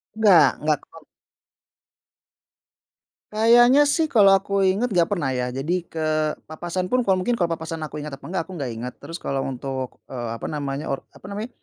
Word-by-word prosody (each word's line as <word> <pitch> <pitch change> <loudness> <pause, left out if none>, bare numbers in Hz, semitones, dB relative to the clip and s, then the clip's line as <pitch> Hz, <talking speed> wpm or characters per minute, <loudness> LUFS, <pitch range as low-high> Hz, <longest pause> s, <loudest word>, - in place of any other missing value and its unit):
Enggak 205 -7 +6
enggak, 150 -1 +1
ko 165 - -14 2.4
Kayaknya, 240 +5 +6
sih, 325 - +2
kalau 200 -3 +7
aku 200 - -15 0.2
inget 225 +6 0
nggak 170 -2 +3
pernah, 160 -9 0
ya, 125 - 0
jadi 155 +6 -1 0.2
ke 160 - -5 0.5
papasan 175 +3 -4
pun 255 - +3
kalau 190 -3 +2
mungkin 240 +6 0
kalau 175 -5 0
papasan 160 -1 -4
aku 150 0 -6
inget 150 -2 -6
atau - - -23
enggak, 185 - 0
aku 190 - -9
nggak 135 -6 -4
inget, 125 +2 -6
terus 165 +4 -7
kalau 135 -1 -1
untuk, 130 0 -5
eee, 120 -3 -5
apa - - -5
namanya 145 -1 -3
or 135 - -3
apa - - -17
namanya, 210 +4 -5
165 Hz, 180 wpm, -23 LUFS, 140-200 Hz, 2.4 s, kalau